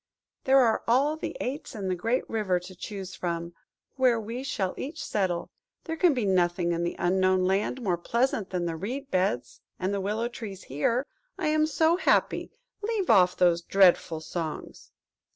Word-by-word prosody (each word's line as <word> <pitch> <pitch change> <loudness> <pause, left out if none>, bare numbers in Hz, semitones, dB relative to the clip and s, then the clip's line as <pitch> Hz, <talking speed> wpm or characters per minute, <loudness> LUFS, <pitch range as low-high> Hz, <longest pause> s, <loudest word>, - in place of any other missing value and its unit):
There 265 +1 +5
are 235 -4 +4
all 275 +6 +3
the 315 - -5
aits 265 +1 -4
in 200 -3 -4
the 185 - +1
great 230 +8 -1
river 205 -5 0
to 180 +1 -10
choose 190 0 -7
from, 170 -1 -4 0.4
where 250 -3 +3
we 230 +3 -5
shall 190 -8 -2
each 305 +4 -6
settle; 185 -4 -1 0.3
there 325 - -4
can 325 -3 +3
be 240 -4 0
nothing 175 -2 +2
in 170 0 -1
the 175 - -2
Unknown 185 +1 +2
Land 200 +7 0
more 180 -5 0
pleasant 235 0 0
than 180 -2 -2
the 165 -1 -2
reed 255 - -5
beds 180 -11 -1 0.2
and 190 +2 -1
the 200 - -1
willow 215 +4 -1
trees 210 -5 -8
here. 230 - 0 0.3
I 340 -5 0
am 310 0 +3
so 320 +3 +3
happy!–Leave 440 0 0
off 185 -4 +5
those 175 -2 +3
dreadful 175 -4 +3
songs!" 160 -1 -6
200 Hz, 170 wpm, -27 LUFS, 180-260 Hz, 0.4 s, There